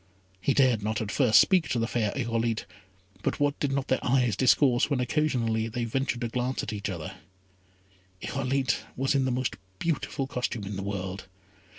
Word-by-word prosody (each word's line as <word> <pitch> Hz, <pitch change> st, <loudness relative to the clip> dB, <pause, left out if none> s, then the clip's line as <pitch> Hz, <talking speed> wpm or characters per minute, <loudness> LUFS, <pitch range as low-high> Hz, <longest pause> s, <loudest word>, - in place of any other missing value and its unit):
He 140 Hz, -, +1 dB
dared 130 Hz, -6 st, +4 dB
not 110 Hz, +1 st, -1 dB
at 110 Hz, -2 st, -3 dB
first 120 Hz, -6 st, +5 dB
speak 185 Hz, -5 st, +4 dB
to -, -, 0 dB
the 115 Hz, -, +1 dB
fair 115 Hz, -3 st, 0 dB
Irolite; 115 Hz, -3 st, -1 dB, 0.6 s
but -, -, -1 dB
what 145 Hz, 0 st, +1 dB
did 145 Hz, -, 0 dB
not 135 Hz, -1 st, -1 dB
their 130 Hz, -, 0 dB
eyes 125 Hz, -4 st, +2 dB
discourse 130 Hz, +1 st, +4 dB
when 140 Hz, -4 st, +1 dB
occasionally, 120 Hz, -5 st, 0 dB
they 120 Hz, +2 st, -3 dB
ventured 130 Hz, +1 st, -1 dB
to 120 Hz, -, 0 dB
glance 125 Hz, +2 st, -2 dB
at 110 Hz, -, -4 dB
each 105 Hz, 0 st, -3 dB
other. 95 Hz, +1 st, -6 dB, 1.0 s
Irolite 135 Hz, +3 st, 0 dB, 0.2 s
was 135 Hz, +2 st, +1 dB
in 135 Hz, -2 st, +2 dB
the 130 Hz, -, 0 dB
most 125 Hz, 0 st, -1 dB, 0.2 s
beautiful 150 Hz, -, -2 dB
costume 125 Hz, -4 st, -3 dB
in 100 Hz, +1 st, -5 dB
the 95 Hz, -, -4 dB
world. 95 Hz, -1 st, -4 dB
125 Hz, 185 wpm, -28 LUFS, 110-135 Hz, 1.0 s, first